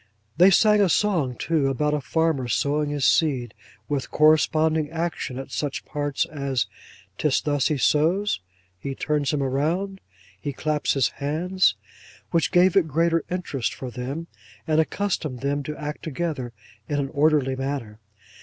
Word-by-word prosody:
They 180 +2 +7
sang 210 +2 +5
a 195 - +4
song 165 -10 +1
too, 155 -2 0
about 150 +3 0
a 150 - 0
farmer 155 -1 0
sowing 145 +4 0
his 145 -2 -1
seed: 130 -8 +2 0.3
with 140 -3 -2
corresponding 155 0 +3
action 165 -5 -3
at 135 - -7
such 145 -2 -3
parts 145 -2 -1
as 140 -6 -2 0.5
''tis 150 -3 +2
thus 145 -3 +1
he 150 - 0
sows,' 165 - +2 0.4
'he 135 +7 -5
turns 145 -2 0
him 145 -2 0
round,' 170 +9 -1 0.4
'he 145 -2 -3
claps 150 +2 0
his 135 -4 +3
hands;' 160 - +1 0.6
which 165 - +1
gave 180 0 +4
it 190 -5 +4
greater 165 +2 +1
interest 170 -8 -2
for 130 -2 -6
them, 135 +7 -5 0.4
and 160 -1 +3
accustomed 160 -8 -2
them 140 +1 0
to 150 +2 -6
act 150 0 -5
together, 150 -5 -3 0.4
in 145 - 0
an 140 -1 -1
orderly 145 -2 +2
manner. 130 -5 -4
150 Hz, 155 wpm, -24 LUFS, 135-165 Hz, 0.6 s, They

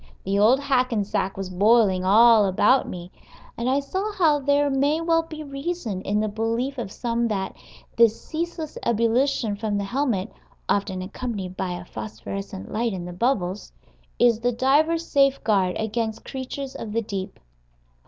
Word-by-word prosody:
The 195 +1 0
old 230 +6 +5
Hackensack 250 -8 0
was 195 -1 -5
boiling 200 -1 +3
all 220 +2 +6
about 255 +8 +3
me, 175 0 -8 0.4
and 235 +2 -1
I 270 +2 +3
saw 380 +9 -3
how 320 -7 +3
there 285 +1 +2
may 285 +3 +1
well 330 0 +2
be 315 -1 -8
reason 275 - -4
in 205 +2 0
the 215 - 0
belief 230 +5 -2
of 195 -5 -5
some 235 0 -1
that 195 -3 -3 0.4
this 230 -1 +4
ceaseless 325 -1 -5
ebullition 230 0 +1
from 205 0 -2
the 200 - -1
helmet 225 -3 -1 0.3
(often 190 -2 0
accompanied 195 -2 -5
by 180 -1 -3
a 175 0 -7
phosphorescent 100 - -7
light 230 0 -1
in 180 -2 -5
the 175 - -7
bubbles) 195 -2 -1 0.5
is 235 -2 +4
the 245 +1 +1
diver's 300 +7 +2
safeguard 220 -10 +2
against 220 0 -3
creatures 265 +1 -6
of 210 -2 -6
the 230 +1 0
deep. 195 -3 -5
230 Hz, 155 wpm, -24 LUFS, 195-275 Hz, 0.5 s, all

